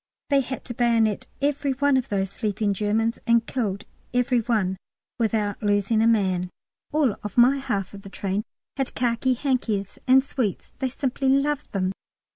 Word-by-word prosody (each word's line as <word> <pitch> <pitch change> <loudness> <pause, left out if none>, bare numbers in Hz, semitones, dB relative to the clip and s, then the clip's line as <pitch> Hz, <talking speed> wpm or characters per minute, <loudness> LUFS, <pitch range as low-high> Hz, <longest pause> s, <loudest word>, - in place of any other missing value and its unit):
They 280 - +5
had 265 +1 -6
to 240 - -5
bayonet 230 -3 +2 0.2
every 285 -1 +1
one 285 +1 +2
of 260 -2 0
those 195 -1 -1
sleeping 210 0 -1
Germans, 220 +3 0
and 235 -1 +4
killed 210 -5 -2 0.3
every 250 0 +3
one 210 -5 0 0.4
without 215 -3 0
losing 205 +1 +2
a 225 - +4
man. 190 -5 +2 0.4
All 290 -8 +2 0.2
my 250 +3 +6
half 225 -9 -2
of 200 - -9
the 195 - -10
train 195 +1 -2 0.4
had 270 -2 -2
khaki 250 +1 +1
hankies 230 -7 -1
and 260 +1 +6
sweets; 245 -8 -3
they 265 - 0
simply 265 +1 -1
loved 285 +2 +1
them. 185 -2 0
230 Hz, 160 wpm, -25 LUFS, 205-260 Hz, 0.4 s, my